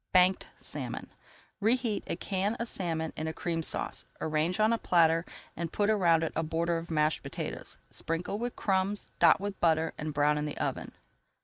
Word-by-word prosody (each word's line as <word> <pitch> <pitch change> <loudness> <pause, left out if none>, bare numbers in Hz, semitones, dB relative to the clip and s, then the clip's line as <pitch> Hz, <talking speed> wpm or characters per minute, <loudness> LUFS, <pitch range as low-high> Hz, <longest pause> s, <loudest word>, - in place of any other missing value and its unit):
BANKED 185 0 +4
SALMON - - -6 0.5
Reheat 230 0 +1
a - - -1
can 195 +4 -1
of 235 - -3
salmon 165 -6 -2
in 155 - -3
a 160 - -2
Cream 165 -1 -2
Sauce. - - +1 0.2
Arrange 160 +5 0
on 215 +2 +4
a 230 - 0
platter 165 -1 +4 0.3
and 170 0 -4
put 205 +1 +2
around 170 -6 +4
it 160 - -2
a 160 - +1
border 165 +1 0
of 165 - -9
mashed 155 -1 +1
potatoes. - - -6
Sprinkle 170 +5 -3
with 240 +1 -3
crumbs, 195 +1 0
dot 170 -2 +6
with 200 0 -4
butter, 160 -1 +2
and 155 0 -3
brown 150 0 +2
in 150 - -2
the 150 - -5
oven. - - -3
170 Hz, 185 wpm, -30 LUFS, 160-200 Hz, 0.5 s, dot